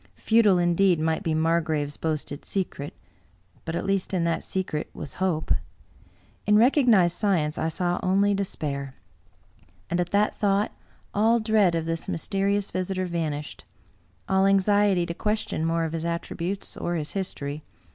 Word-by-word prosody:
Futile, 220 -4 +4
indeed, 175 0 +3
might 160 +2 0
be 165 -5 -1
Margrave's 155 -2 0
boasted 155 -2 -3
secret; 180 -7 -4 0.7
but 165 - -3
at - - -2
least 195 -1 0
in 175 - +1
that 170 0 0
secret 180 -5 -3
was 140 - -7
hope. 175 -5 0 1.0
In 210 0 +6
recognized 230 - +4
science 170 -8 +1
I 160 - 0
saw 175 +1 -1
only 200 +2 +3
despair. 140 -8 -3 1.0
And 175 - +1
at 175 -1 0
that 205 +2 +2
thought 205 0 +1 0.4
all 225 +3 +3
dread 215 -5 +3
of 165 -1 -1
this 165 0 -3
mysterious 200 +3 -1
visitor 185 0 -2
70 180 - -7
Bulwer 170 - -1
Lytton - - -2
vanished 150 0 -8 0.3
— - - -37
^all 190 0 +4
anxiety 195 -2 +3
to 170 - -4
question 210 -4 -2
more 165 0 +1
of 160 0 -3
his 165 -1 -3
attributes 170 +3 -4
or 175 - -2
his 155 -2 -3
history. 150 -6 -4
175 Hz, 160 wpm, -26 LUFS, 160-200 Hz, 1.0 s, In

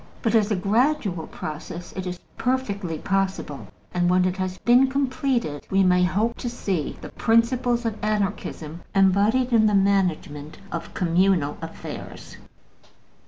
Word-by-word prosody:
But 225 -3 +1
as 220 -2 +4
a 210 - +1
gradual 205 - +1
process 160 +3 -7
it 190 -1 -4
is 180 0 -4 0.2
perfectly 205 -10 -1
possible; 195 -6 -2 0.3
and 175 0 +2
when 180 0 +3
it 185 +1 -1
has 185 -1 -3
been 245 +3 +5
completed 260 - -1
we 195 0 +3
may 180 -1 +4
hope 210 +6 +1
to 240 - -3
see 195 -10 -3
the - - -7
principles 240 +1 +2
of 220 -2 -3
Anarchism 200 -6 -2
embodied 205 +6 +3
in 220 -2 +5
the 210 - +2
management 180 -7 0
of 170 - -6
communal 175 -4 +2
affairs. 165 0 -8
195 Hz, 140 wpm, -24 LUFS, 180-230 Hz, 0.3 s, been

